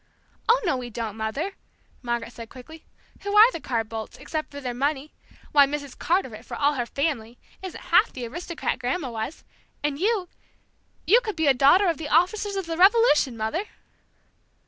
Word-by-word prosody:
"Oh, 475 +2 +6
no, 290 -7 +1
we 245 -1 -6
don't, 225 -2 -5
Mother," 225 - -3 0.5
Margaret 235 -1 -3
said 230 -1 -9
quickly. 315 +5 -13 0.3
"Who 405 0 -3
are 440 +4 +8
the 335 - -5
Carr 235 -6 -1
Boldts, 220 0 -7
except 310 -1 -4
for 285 - -8
their 250 -3 -4
money? 280 +3 -2 0.4
Why, 285 -2 +6
Mrs. 285 -1 -5
Carteret, 260 - -1
for - - -7
all 290 +1 +3
her 245 -4 -2
family! 245 -5 -2 0.2
isn't 375 -2 -7
half - - +3
the 250 -2 -6
aristocrat 335 +3 -4
Grandma 260 +2 -2
was! 225 +7 -5 0.4
And 295 -1 -1
you 400 -1 +1 0.8
you 460 +7 +6
could 430 -4 -4
be 320 -1 0
a 280 - +6
Daughter 285 +10 +5
of 335 -3 +1
The 300 -2 -5
Officers 395 +6 +2
of 390 -2 -2
the 330 -1 -4
Revolution, 370 - +4
Mother!" 225 - -2
290 Hz, 180 wpm, -25 LUFS, 245-355 Hz, 0.8 s, are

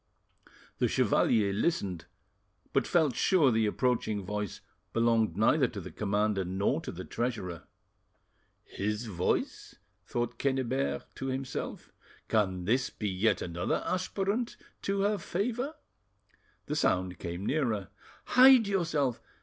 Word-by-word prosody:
The - - +3
chevalier 100 -3 +2
listened, 100 - -1 0.7
but - - +2
felt 155 -8 +2
sure 160 -9 +4
the 110 -1 +2
approaching 110 -3 0
voice 105 0 -3 0.3
belonged 115 -2 +2
neither 130 +6 +4
to 110 - -7
the 90 - -8
commander 105 -1 0
nor 95 +3 0
to - - -6
the - - -7
treasurer. 100 - -3 1.0
"'His 105 +3 -3
voice'?" 90 -5 -2 0.3
thought 120 0 -2
Quennebert 115 - 0
to 135 - -4
himself. 130 0 -4 0.4
"Can 95 -5 +1
this 125 +6 +2
be 105 - -3
yet 95 +4 +1
another 85 +1 -2
aspirant 200 +5 -1 0.2
to 195 0 0
her 205 0 +1
favour?" 245 - -2 0.9
The 150 - -3
sound 90 - +1
came 85 +3 -5
nearer. 115 - 0 0.4
"Hide 255 -2 +7
yourself!" 160 - 0
115 Hz, 120 wpm, -30 LUFS, 100-155 Hz, 1.0 s, Hide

